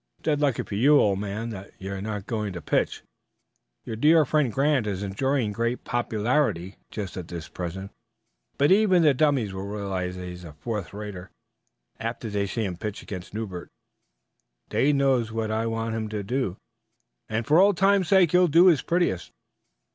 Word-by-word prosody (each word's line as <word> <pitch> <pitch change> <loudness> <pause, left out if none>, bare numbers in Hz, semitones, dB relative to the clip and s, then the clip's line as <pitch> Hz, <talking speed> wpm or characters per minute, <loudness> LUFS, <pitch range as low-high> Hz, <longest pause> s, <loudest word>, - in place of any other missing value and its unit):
"It's - - -34
dead 150 -2 +1
lucky 140 -5 +1
for - - -9
you, 140 +8 +5
old 100 -2 +2
man, 105 +3 -4
that 100 -2 -9
you're 95 0 -5
not 105 -1 -4
going 105 -4 -3
to 90 - -5
pitch. - - 0 0.8
Your 110 - -4
dear 155 +6 +5
friend 145 -3 +1
Grant 135 -2 +1
is 100 -1 -3
enjoying 115 +3 0
great 115 +3 -2
popularity 110 - 0
just 100 -4 -6
at 85 -2 -7
present, 95 +3 -5 0.7
but 145 +4 +3
even 190 -3 +5
the 150 -3 +5
dummys 130 -8 +1
will 95 +1 -5
realize 95 -3 -3
that 90 0 -7
he's 90 0 -8
a 80 -4 -10
fourth 105 +5 -5
rater 100 -3 -7 0.7
after 115 -1 -4
they 100 -1 0
see 110 +2 -2
him 90 -3 -4
pitch 105 +1 -5
against 95 0 -8
Newbert. 95 -6 -5 1.0
Dade 145 +2 +2
knows 130 -5 +2
what 110 -1 -2
I 110 +1 0
want 115 0 -2
him 110 -1 -3
to 105 -1 -3
do, 120 -3 -2 0.7
and 110 +1 -1
for 155 +7 +5
old 200 -1 +5
times 195 -1 +3
sake 185 -4 +5
he'll 180 0 +5
do 170 +3 +6
his 155 -7 +3
prettiest. 170 - 0
110 Hz, 175 wpm, -26 LUFS, 100-140 Hz, 1.0 s, do